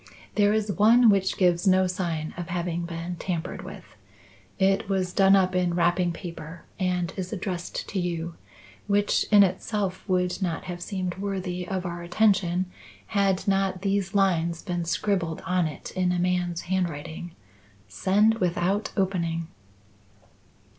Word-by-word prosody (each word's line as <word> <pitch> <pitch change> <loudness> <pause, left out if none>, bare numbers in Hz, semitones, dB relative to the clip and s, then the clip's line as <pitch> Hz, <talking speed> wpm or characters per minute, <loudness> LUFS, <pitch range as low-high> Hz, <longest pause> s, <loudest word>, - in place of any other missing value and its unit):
"There 205 0 +3
is 215 -1 0
one 225 +3 +6
which 190 -1 +1
gives 180 0 +2
no 185 0 +5
sign 170 -4 -2
of 175 -1 -5
having 175 -1 -2
been 170 +1 -5
tampered 175 -1 -4
with. - - -9 0.7
It 195 +2 +2
was 185 -2 0
done 195 0 +6
up 185 -1 +3
in 180 -1 +1
wrapping 175 0 +2
paper 170 -1 -8 0.2
and 180 -2 0
is 185 -1 -4
addressed 185 -3 -4
to 195 - -2
you, 170 -1 -3 0.5
which 205 0 +2
in 205 -1 +8
itself 190 0 -1
would 180 +1 0
not 170 -4 -2
have 175 -1 -6
seemed 185 -1 -3
worthy 185 -3 -3
of 185 -1 -3
our 175 0 -4
attention 185 -1 +2 0.5
had 195 -2 +1
not 195 -1 +1
these 195 0 0
lines 170 -4 +1
been 175 -3 -2
scribbled 170 -2 -1
on 180 -2 +1
it 150 - -8
in 185 -1 0
a 180 - 0
man's 175 -1 0
handwriting: 175 -2 -3 0.5
'Send 205 - +2
without 185 +3 0
opening. 170 -4 -1
180 Hz, 145 wpm, -26 LUFS, 175-195 Hz, 0.7 s, in